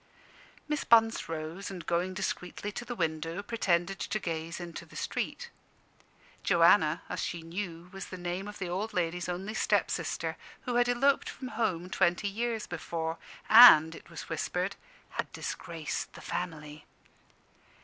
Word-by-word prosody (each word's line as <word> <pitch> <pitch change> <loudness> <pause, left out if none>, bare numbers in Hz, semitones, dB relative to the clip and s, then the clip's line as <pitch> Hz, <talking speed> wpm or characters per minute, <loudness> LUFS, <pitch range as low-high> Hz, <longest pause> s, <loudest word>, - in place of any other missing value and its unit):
Miss 300 -1 -1
Bunce 225 -4 +4
rose, 165 +4 -5
and 185 -3 -7
going 180 +2 0
discreetly 195 +1 -3
to 240 - -5
the 240 0 -5
window, 165 +1 -2
pretended 195 -4 0
to 215 - -1
gaze 165 -3 -4
into 170 -1 -7
the - - -16
street. 475 -1 -3 0.9
Joanna, - - +5
as - - -4
she 170 -1 -3
knew, 170 0 -5
was 195 -1 -6
the 185 - -7
name 180 +2 -3
of 210 - -8
the 185 - -3
old 200 +5 -3
ladies' 175 0 -1
only 190 +4 -3
step - - +2
sister, - - -2 0.2
who 250 - -3
had 245 0 +3
eloped 270 +3 +3
from 255 - -7
home 180 -8 -1
twenty 185 +1 +1
years 225 +2 -2
before, 165 -1 -4 0.3
and 190 -9 +10
(it - - -12
was 170 -2 -8
whispered) 180 +4 -2 0.4
had - - -3
disgraced 165 -3 -4
the - - -11
family. 155 -4 -5
180 Hz, 150 wpm, -30 LUFS, 165-215 Hz, 0.9 s, and